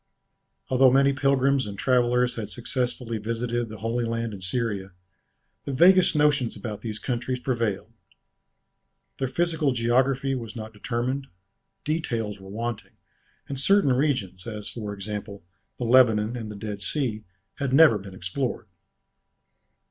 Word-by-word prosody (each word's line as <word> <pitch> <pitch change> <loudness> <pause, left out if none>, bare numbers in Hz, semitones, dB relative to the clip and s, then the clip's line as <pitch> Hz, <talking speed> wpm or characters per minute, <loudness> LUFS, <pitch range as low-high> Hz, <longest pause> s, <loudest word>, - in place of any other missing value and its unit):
Although 130 0 +6
many 140 +2 +4
pilgrims 135 -2 +2
and 100 -1 -7
travellers 125 +1 +2
had 110 -3 -5
successively 120 -1 -3
visited 115 +2 -2
the 110 - -8
Holy 115 +2 -1
Land 115 -1 -2
and 95 -2 -9
Syria, 100 -2 -2 0.7
the 140 - -3
vaguest 180 +5 +6
notions 145 -5 +2
about 105 0 -6
these 110 -2 -5
countries 125 +2 -2
prevailed. 115 -4 -2 1.3
Their 135 - 0
physical 160 0 0
geography 130 +3 +1
was 115 -4 -5
not 110 -1 -7
determined, 125 +5 -2 0.6
details 115 -10 -2
were 95 0 -12
wanting, 115 +2 -5 0.5
and 135 -1 -5
certain 195 -2 +4
regions, 125 -9 -1
as 105 -2 -6
for 105 -3 -5
example, 100 -1 -6 0.3
the 125 - -3
Lebanon 115 -2 +4
and 115 -3 -5
the 105 - -7
Dead 100 0 -6
Sea 115 -5 -1 0.4
had 140 -2 -1
never 140 -6 +6
been 95 -1 -10
explored. 105 +10 -3
120 Hz, 135 wpm, -26 LUFS, 105-135 Hz, 1.3 s, Although